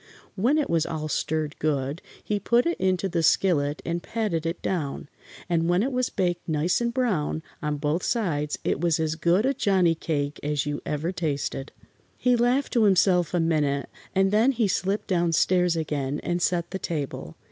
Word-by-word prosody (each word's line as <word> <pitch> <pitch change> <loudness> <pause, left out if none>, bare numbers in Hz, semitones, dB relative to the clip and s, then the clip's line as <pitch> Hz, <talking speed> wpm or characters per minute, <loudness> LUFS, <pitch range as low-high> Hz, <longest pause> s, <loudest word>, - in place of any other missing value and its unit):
When 245 +10 +2
it 300 - +1
was 165 -2 +1
all 155 -1 -3
stirred 155 0 -2
good 145 0 -1 0.2
he 210 -1 -1
put 235 +4 +2
it 340 - -1
into 185 0 +1
the 170 -2 -1
skillet 155 -3 +2
and 170 0 -2
patted 185 -9 -2
it 165 - -3
down, 145 -6 -3 0.4
and 165 -1 +1
when 175 +3 +3
it 270 - -1
was 250 -1 0
baked 175 -2 -2
nice 160 +7 +1
and 235 0 0
brown 200 - -1 0.2
on 150 -1 -1
both 150 +4 0
sides 160 -12 -1
it - - -1
was 170 -3 +2
as 160 -1 0
good 170 +6 +2
a 270 - +2
Johnnie 190 -9 +3
cake 145 -3 -2
as 145 -1 -1
you 145 0 -3
ever 150 +4 -1
tasted. 145 -5 -3 0.5
He 250 -1 +3
laughed 245 +4 +1
to 230 -4 +4
himself 180 -3 +3
a - - +2
minute 150 -4 0 0.3
and 195 0 +3
then 225 +6 +4
he 230 -4 +1
slipped 195 +2 -1
down 175 -2 +1
stairs 180 +1 +3
again 145 -3 -2
and 175 0 -1
set 170 -1 0
the 190 - -3
table. 150 -7 -4
170 Hz, 190 wpm, -25 LUFS, 150-195 Hz, 0.5 s, to